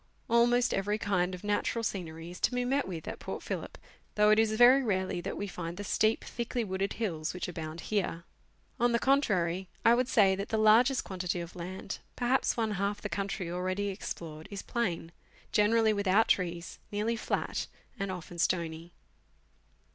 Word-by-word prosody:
Almost 240 +1 +4
every 205 +2 0
kind 185 -3 0
of 180 - -12
natural 210 +2 0
scenery 170 -5 -4
is 180 - -9
to 250 - +1
be 245 0 0
met 270 +3 +1
with 170 -4 -6
at - - -5
Port - - -6
Phillip, - - -5 0.4
though 210 0 +5
it 215 - +5
is 220 -1 +3
very 245 +4 +7
rarely 190 -6 -1
that - - -4
we 205 - -2
find 175 -3 -6
the 205 - -4
steep, 215 +2 +1
thickly 235 0 -3
wooded 195 -1 -2
hills 170 -7 -2
which 180 - -3
abound 165 -2 -6
here. 190 -5 -1 0.6
On 240 0 +3
the - - +4
contrary, 190 -10 +1 0.2
I 230 - +7
should 250 0 +1
say 200 -6 +5
that 195 +1 -4
the 220 - 0
largest 230 +5 +5
quantity 180 -2 -3
of 170 0 -7
land 185 +3 -6 0.2
perhaps 250 +1 +1
one 225 -2 0
half 200 +1 -1
the 205 - -5
country 195 -4 -3
already 185 +3 -1
explored 165 -5 -6
is 200 -2 -6
plain, 175 -8 -2 0.4
generally 220 +1 +4
without 200 +2 +3
trees, 170 -2 -1
nearly 210 +3 0
flat - - -2 0.3
and 195 -1 -2
often 175 -1 -7
stony. 165 -1 -1
200 Hz, 175 wpm, -30 LUFS, 180-225 Hz, 0.6 s, very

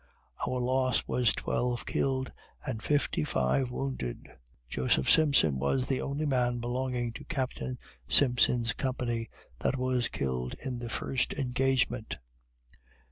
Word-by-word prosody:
Our 125 - -1
loss 130 +1 +1
was 125 -3 +3
twelve 125 -1 -1
killed 130 -1 0 0.3
and 110 - -3
fifty 145 - +1
five 75 - +1
wounded. 125 - -4 0.4
Joseph 65 +1 +1
Simpson 140 - +5
was 100 - +1
the 135 -1 -1
only 140 +3 -2
man 125 -3 +1
belonging 120 0 -2
to - - -8
Captain 130 -3 -3 0.3
Simpson's 120 - +4
company 120 -4 -2 0.3
that 135 - 0
was 125 -1 +1
killed 65 -2 -3
in 125 -2 -5
the 120 -1 -5
first 130 +3 -1
engagement. 130 - 0
125 Hz, 125 wpm, -30 LUFS, 115-130 Hz, 0.4 s, Simpson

